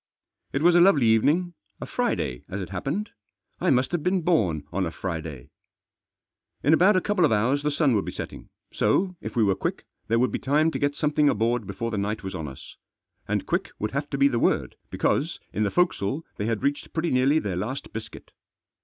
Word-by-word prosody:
It 140 - -1
was 175 0 +6
a 175 - +7
lovely 165 -9 +5
evening, 150 +11 +3 0.3
a - - -5
Friday 60 - -2
as 100 - -4
it 90 -4 -5
happened 140 - -3 0.2
— - - -50
I - - +2
must 130 0 +2
have 175 -2 -1
been 180 +1 +1
born 95 - +1
on 95 -1 0
a - - -2
Friday! 80 -7 -6 1.1
In 145 - +4
about 185 +6 +5
a 185 - +3
couple 205 -2 +1
of 155 - +4
hours 120 +7 +2
the 150 - 0
sun 145 -2 +2
would 105 -3 +1
be - - -4
setting, - - -8 0.2
so, 185 0 +1
if 110 - -6
we 115 - +3
were 100 -2 +3
quick, - - -3 0.2
there 115 - +2
would 125 -1 +2
be - - -2
time 150 +4 +2
to - - -3
get 145 0 0
some 150 +1 0
thing 150 -1 +3
aboard 115 -1 0
before 115 0 -4
the 105 - -1
night 105 +2 -2
was 95 0 -5
on 80 -4 -4
us. 65 -1 -11 0.5
And - - -1
quick - - -1
would 105 - -3
have 140 +2 -3
to 140 - -2
be 140 0 +5
the 120 -4 0
word, - - +1
because, - - 0
in 105 - -2
the 105 - +2
forecastle 155 - 0
they 105 - -2
had 115 -2 -1
reached 145 +1 -1
pretty 165 +1 -1
nearly 130 +4 +3
their 100 - -1
last 110 +10 -4
biscuit. 115 - -8
130 Hz, 225 wpm, -25 LUFS, 105-155 Hz, 1.1 s, a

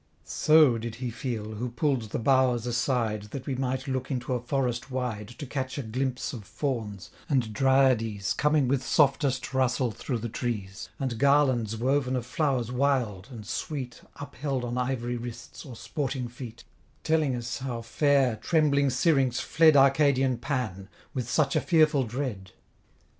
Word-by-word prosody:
So 155 -7 +4
did 115 0 -5
he 125 0 -4
feel, 115 -3 -4
who 115 +4 -4
pull'd 120 -2 -1
the - - -2
boughs 125 -2 +2
aside, 120 -3 0
That 130 +3 -7
we 135 - -2
might 130 +1 -2
look 130 -1 -2
into 130 -1 -2
a 125 - 0
forest 125 0 -2
wide, 125 -5 -3
To 145 - -6
catch 130 0 -4
a 140 - -3
glimpse 130 +5 -2
of 115 -5 -7
Fawns, 105 -5 -4 0.2
and 125 -7 +1
Dryades 130 -6 +2
Coming 150 -2 +2
with 130 0 +1
softest 135 -3 +2
rustle 130 -2 +1
through 125 +3 -4
the 115 +1 -4
trees; 105 -4 -4
And 125 -4 -2
garlands 130 -6 +3
woven 130 +2 +1
of 125 -2 -2
flowers 125 -3 -1
wild, 125 -7 0
and 115 -5 -9
sweet, 130 +1 -5
Upheld 140 -2 -4
on 120 0 -3
ivory 125 -1 -2
wrists, 120 +3 -8
or 125 - -9
sporting 135 -1 -3
feet: 120 -1 -10 0.4
Telling 155 -5 +1
us 120 +2 -4
how 125 -3 -4
fair, 135 -1 +2
trembling 145 -3 +2
Syrinx 130 -2 +2
fled 160 -2 +4
Arcadian 135 -2 +4
Pan, 110 -8 -3 0.2
with 125 -2 -3
such 140 0 +1
a - - +3
fearful 155 -5 +3
dread. 110 -6 -5
125 Hz, 160 wpm, -27 LUFS, 120-140 Hz, 0.4 s, So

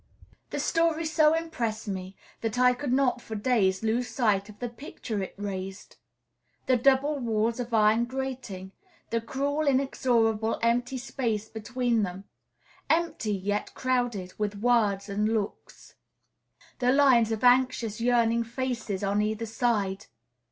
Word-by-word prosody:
The - - -3
story 330 -1 +1
so 310 0 +4
impressed 235 -10 -3
me 190 -1 -5 0.3
that 225 0 -2
I 250 0 +5
could 250 +1 -4
not 255 -2 +2
for 220 - -7
days 205 -4 +1
lose 235 +3 0
sight 210 -5 +1
of 210 - -12
the 245 - -3
picture 230 -3 -6
it 190 - -6
raised; 195 -1 -6 0.7
the 260 - +3
double 275 +4 +3
walls 230 -1 0
of 245 -1 -4
iron 220 +1 +4
grating; 250 -7 -5 0.4
the 230 0 0
cruel, 285 +5 -1
inexorable, 235 -5 +1
empty 245 +2 +1
space 235 -4 -2
between 235 +1 -1
them, 190 -1 -4 0.7
empty, 325 -9 +1
yet 205 +2 -2
crowded 245 -8 -1
with 210 -1 -1
words 210 -3 +2
and 210 +2 0
looks; 205 -2 -5 0.9
the 250 0 +3
lines 255 -5 +5
of 220 0 -3
anxious, 245 -3 +3
yearning 235 -1 +3
faces 230 -4 -3
on 200 +1 +1
either 215 +2 -1
side. 215 -4 -1
230 Hz, 135 wpm, -27 LUFS, 210-255 Hz, 0.9 s, I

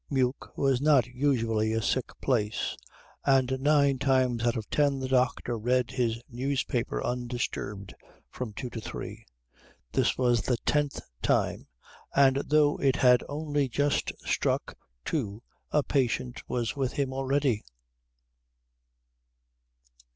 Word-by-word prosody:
Meuk 130 -2 -1
was 135 -2 +2
not 145 -4 +5
usually 115 -4 0
a 115 - +1
sick 130 - -1
place, 110 -5 0 0.5
and 130 -1 +2
nine 140 -2 +3
times 130 -3 +2
out 120 0 +1
of 110 - -5
ten 145 -2 +2
the 130 - -3
doctor 125 -2 +1
read 125 +2 +1
his 115 -3 0
newspaper 130 -1 -2
undisturbed 120 -5 -3 0.4
from 125 -4 -5
two 110 +5 -6
to 115 - -5
three; - - -7 0.6
this - - +1
was 120 -2 +3
the 125 - 0
tenth 145 -1 +1 0.2
time, - - 0 0.5
and 135 -1 +5
though 150 -1 +4
it 135 -2 +2
had 125 -1 +5
only 145 -2 -1
just 145 +3 0 0.2
struck - - 0 0.3
two 115 -7 -2 0.3
a 150 - +2
patient 125 -2 -1
was 120 -2 -1
with 135 -3 -1
him 135 -2 -1
already. 135 -3 0
130 Hz, 125 wpm, -28 LUFS, 120-140 Hz, 0.6 s, not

